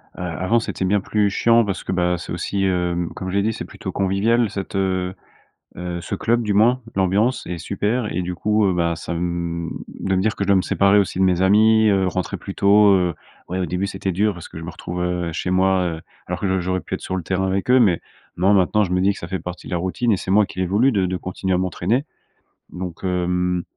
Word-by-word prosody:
avant, 90 +6 0
c'était 105 - -4
bien 100 +2 +2
plus 105 +1 +1
chiant 115 +3 +4
parce 100 -2 -3
que, - - -4
bah, 90 -1 +1
c'est - - -8
aussi, 95 +2 -1
hem, 90 -2 0
comme 95 - -5
je 95 - -3
l'ai 100 - +2
dit, 110 +1 0
c'est - - -6
plutôt - - -7
convivial 105 +4 +1
cette 100 -1 -6
heu, 95 -1 0 0.6
heu, 90 -1 -4
ce - - -4
club 120 +1 +1
du 105 - 0
moins. 120 +5 +4
L'ambiance 100 +6 +1
est 90 -1 -4
super 105 +6 -1
et 90 - -1
du 90 0 -4
coup, 105 +1 +2
heu, 95 - +2
bah, 85 -1 0
ça, 85 +1 -5
mmh, 85 -1 -2 0.3
de 95 0 0
me 95 - +2
dire 110 +1 0
que 100 - -1
je - - -6
dois 100 -1 +4
me 95 - +3
séparer 100 +3 +3
aussi 95 -2 -2
de 95 - +4
mes 90 0 +2
amis, 110 +3 +5
heu, 95 -2 +3
rentrer 90 -1 -2
plus - - -8
tôt, 100 0 +5
heu, 90 -3 +1 0.3
ouais, 90 +2 -3
au 90 - -1
début, 90 +4 -2
c'était 95 -1 -3
dur 105 +4 +1
parce 85 -3 -10
que - - -9
je - - -9
me 85 - -6
retrouvais, 90 +1 -5
heu, 90 -2 -2
chez 90 - -3
moi, 95 0 +3
heu, - - -10 0.3
alors - - -2
que 100 - -1
j'au 95 0 +1
j'aurais 95 +1 -1
pu - - -6
être - - -4
sur 95 - -4
le 90 - -4
terrain 95 +1 0
avec 95 +4 -1
eux. 130 0 +6
Mais, 95 -7 +3 0.4
non, 95 +4 +3
maintenant, 100 +2 +3
je 90 - -4
me 90 - +2
dis 100 +2 +3
que - - -10
ça 85 - -6
fait 95 +1 -4
partie 90 0 -8
de - - -7
la 90 - +1
routine 95 +6 0
et - - +3
c'est 95 - -5
moi 105 0 +5
qui 95 - -7
l'ai 95 - +1
voulu 110 +9 +3
de 95 -3 +1
de 90 - -2
continuer 95 +1 -3
à 90 - +2
m'entraîner 95 +7 0 0.7
donc, 90 -2 -6
hem, 90 -1 0
95 Hz, 260 wpm, -21 LUFS, 90-100 Hz, 0.7 s, eux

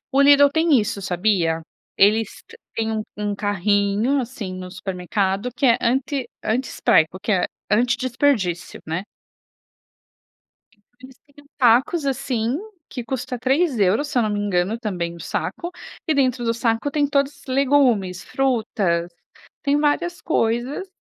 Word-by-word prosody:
O - - +3
Lidl 285 0 +7
tem 325 +2 +2
isso, 210 -1 -3
sabia? 175 -3 +1 0.4
Eles 215 +3 +4 0.5
têm 225 0 -1
um 215 -1 -1
um 205 0 -2
carrinho 205 +5 +1
assim 225 -7 -6
no 185 0 -7
supermercado 190 +3 -2
que 270 - +2
é 240 -1 +5
anti 265 +2 0 0.2
anti-spreco, 215 -7 +1
que 210 +2 -1
é 185 -2 +2 0.2
anti 235 +4 +3
desperdício, 240 -9 0
né. 165 +4 -3 2.0
Eles 260 0 -14
têm 285 - -28
uns 285 - -28
sacos, 260 +6 +3
assim, 255 -3 -1 0.3
que 245 - -6
custa 250 +1 -4
3 265 +3 +1
euros, 210 +9 +2
se - - -7
eu 240 - +4
não 215 - 0
me 205 - -1
engano, 200 +2 0
Também 180 -7 -3
o 170 - -12
saco. 345 - -4 0.4
E 315 - +3
dentro 260 -3 +1
do 230 0 +1
saco 230 +3 0
tem 295 -1 +1
todos 280 0 0
legumes, 255 -9 +2
frutas, 210 -10 0 0.5
tem 285 +1 +2
várias 345 +4 0
coisas, 250 +6 -1
230 Hz, 145 wpm, -22 LUFS, 200-270 Hz, 2.0 s, Lidl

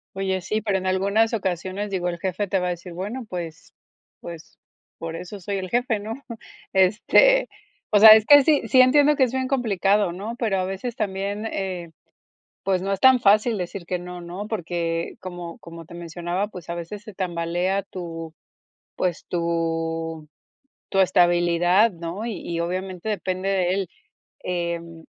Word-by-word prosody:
Oye, 190 -1 -1
sí, 215 +4 -1
pero 200 -3 0
en 185 0 -4
algunas 200 +5 +2
ocasiones, 190 0 -2
digo, 180 -2 -1
el 170 - -5
jefe 190 +3 -2
te 190 0 +1
va 180 - -1
a - - 0
decir: 175 +1 -7
"Bueno, 210 +8 -5
pues 170 -3 -7 0.5
pues 170 -2 -10 0.4
por 165 0 -6
eso 180 +4 -8
soy 200 +2 -3
el 185 -1 -5
jefe, 240 -2 0
¿no?". 220 +2 -5 0.6
Este, 230 - +4 0.4
o 205 - +5
sea, 220 +1 +11
es 215 0 +9
que 290 +1 +8
sí 300 -1 +3
sí, 255 -1 +6
entiendo 290 +3 +5
que 265 - +3
es 250 - +1
bien 260 0 -1
complicado, 205 -7 +1
¿no?, 210 +6 -6
pero 215 -6 0
a 185 - 0
veces 195 +6 -4
también, 200 +1 -3
eh, 185 -5 -4 0.7
pues, 190 -1 +1
no 195 - -2
es 195 - -3
tan 260 -1 +6
fácil 215 +1 +4
decir 180 0 -5
que 180 - -1
no, 180 0 -8
¿no?, 180 +4 -7
porque 170 -5 -3
como 175 -2 -7
como 165 -1 -11
te 170 - -12
mencionaba, 175 +3 -3
pues, 180 -5 -11
a 170 - -3
veces 175 +5 -7
se 210 -2 -12
tambalea 175 +2 -1
tu, 165 -4 -8 0.6
pues, 180 -3 -1
tu 165 -2 -2 0.6
tu 195 - 0
estabilidad, 175 +2 +4
¿no? 170 +6 -6
Y 235 - -3
y 170 -1 -4
obviamente 185 +3 -4
depende 185 -2 -2
de 190 -2 +1
él. 195 -2 -2 0.6
Em, 170 -2 -4
185 Hz, 170 wpm, -23 LUFS, 170-210 Hz, 0.7 s, sea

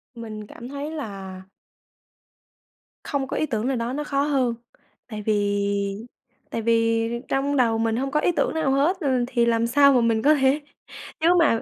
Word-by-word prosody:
Mình 215 -2 -8
cảm 240 - -10
thấy 285 +2 -5
là 195 -10 -7 1.6
không 275 -2 -2
có - - -3
ý 310 - +1
tưởng 230 -4 -2
nào 265 -1 0
đó 235 +2 -2
nó 295 +2 -2
khó 280 -1 0
hơn, 265 -5 +1 0.5
tại 215 -3 -6
vì 200 0 0 0.5
tại 230 - -2
vì 230 0 +2 0.2
trong 280 +1 0
đầu 230 -3 +3
mình 225 0 0
hông 270 +2 -2
có 300 - +2
ý 355 - +2
tưởng 335 - 0
nào 320 -4 0
hết, 300 +8 +2
ừ, 260 -6 +1
thì 240 -2 +1
làm 230 0 +2
sao 280 +3 +5
mà 250 - +4
mình 225 -1 +2
có 300 +2 +5
thể 270 +2 +2 0.6
chứ 320 - +2
mà 290 -9 +3
240 Hz, 185 wpm, -24 LUFS, 225-280 Hz, 1.6 s, sao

